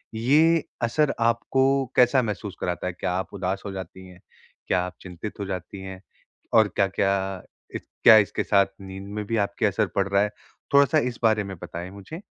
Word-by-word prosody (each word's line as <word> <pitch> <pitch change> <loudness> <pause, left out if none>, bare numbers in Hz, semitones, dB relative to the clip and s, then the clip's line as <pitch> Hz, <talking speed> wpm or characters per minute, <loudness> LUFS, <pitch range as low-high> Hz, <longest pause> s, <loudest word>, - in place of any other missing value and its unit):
ये 155 +8 +3 0.2
असर 135 +5 +1
आपको 130 +4 +2
कैसा 125 +2 +5
महसूस 105 -3 -4
कराता 90 +1 -3
है? 90 - -3
क्या 90 - -3
आप 95 +2 -3
उदास 95 0 -3
हो 100 - -4
जाती 95 -1 -8
हैं? 90 -1 -15 0.5
क्या 90 - +2
आप 90 - -8
चिंतित 90 +4 -8
हो 100 - -3
जाती 95 0 -6
हैं, 95 -1 -8 0.5
और 110 -2 +6
क्या-क्या, 95 -1 0 0.3
क्या 110 - +5
इसके 105 - +1
साथ 100 -1 +4 0.2
नींद 95 0 -9
में 105 0 -3
भी 115 +2 -1
आपकी 100 +2 0
असर 105 +1 +1
पड़ 100 0 +1
रहा 100 0 +3
है, 105 - -1 0.4
थोड़ा-सा 140 +3 +5
इस 125 -5 -1
बारे 110 -2 +3
में 95 -1 -7
बताएँ 85 +2 -6
मुझे? 100 - -9
100 Hz, 185 wpm, -25 LUFS, 95-115 Hz, 0.5 s, और